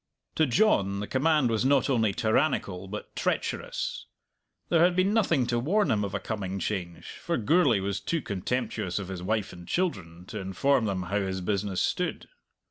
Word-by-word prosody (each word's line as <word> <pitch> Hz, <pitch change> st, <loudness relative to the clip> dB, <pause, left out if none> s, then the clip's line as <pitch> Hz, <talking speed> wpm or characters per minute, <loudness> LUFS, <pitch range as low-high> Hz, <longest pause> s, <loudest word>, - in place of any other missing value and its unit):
To 155 Hz, -, +2 dB
John 110 Hz, -, +2 dB
the 105 Hz, -, -3 dB
command 140 Hz, 0 st, +2 dB
was 110 Hz, 0 st, +1 dB
not 135 Hz, 0 st, +3 dB
only 115 Hz, -6 st, +2 dB
tyrannical, 100 Hz, -3 st, 0 dB
but 105 Hz, +2 st, -7 dB
treacherous. -, -, -2 dB, 0.6 s
There 170 Hz, -1 st, +4 dB
had 175 Hz, 0 st, +4 dB
been 185 Hz, +3 st, +2 dB
nothing 170 Hz, -, +2 dB
to 120 Hz, 0 st, 0 dB
warn 195 Hz, -, +2 dB
him 105 Hz, -1 st, +1 dB
of 100 Hz, 0 st, -3 dB
a -, -, 0 dB
coming 100 Hz, -3 st, -4 dB
change, 90 Hz, -4 st, -4 dB, 0.2 s
for -, -, -1 dB
Gourlay 130 Hz, -, +3 dB
was 100 Hz, +1 st, -2 dB
too 165 Hz, +6 st, -2 dB
contemptuous 100 Hz, -2 st, -2 dB
of 100 Hz, -2 st, -4 dB
his 95 Hz, -2 st, -5 dB
wife 105 Hz, +2 st, -1 dB
and 90 Hz, -1 st, -11 dB
children 90 Hz, -, -2 dB
to -, -, -5 dB
inform 110 Hz, +7 st, +1 dB
them 95 Hz, -3 st, -1 dB
how 100 Hz, +4 st, -1 dB
his 95 Hz, -1 st, -2 dB
business 100 Hz, 0 st, -1 dB
stood. 180 Hz, -, -2 dB
110 Hz, 180 wpm, -28 LUFS, 95-140 Hz, 0.6 s, There